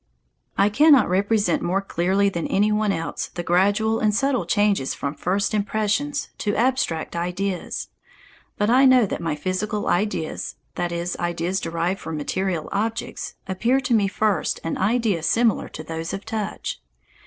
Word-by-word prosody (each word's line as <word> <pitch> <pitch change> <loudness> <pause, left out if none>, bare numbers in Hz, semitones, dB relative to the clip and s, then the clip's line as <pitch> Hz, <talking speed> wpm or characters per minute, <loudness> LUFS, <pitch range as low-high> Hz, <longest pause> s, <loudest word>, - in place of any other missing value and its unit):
I 200 +1 +4
cannot 285 +2 +6
represent 200 0 +1
more 185 +3 +1
clearly 195 +1 +1
than 170 -4 -2
any 205 +2 +2
one 210 -1 +2
else 165 -3 -3
the 175 - -3
gradual 205 +6 +2
and 210 -1 +2
subtle 270 +2 +1
changes 205 -9 +1
from 140 0 -3
first 200 +6 -1
impressions 215 +7 0
to 205 -1 -1
abstract 240 -12 0
ideas. 180 +2 -3 0.7
But 210 +2 +2
I 260 +2 +6
know 255 -3 +6
that 190 - -4
my 165 -3 -1
physical 185 +6 -2
ideas, 180 -4 -1 0.2
that 175 0 -2
is, 170 +1 -2
ideas 175 +2 -1
derived 170 +3 -2
from 160 -1 -5
material 175 +2 -2
objects, 225 +3 -3
appear 230 +8 +1
to 250 - 0
me 210 -3 +4
first 205 +1 0
an 165 - -2
idea 210 -3 +1
similar 225 +7 +2
to 155 - -8
those 160 +1 -5
of 195 - -5
touch. 220 -2 -4
200 Hz, 155 wpm, -23 LUFS, 175-220 Hz, 0.7 s, cannot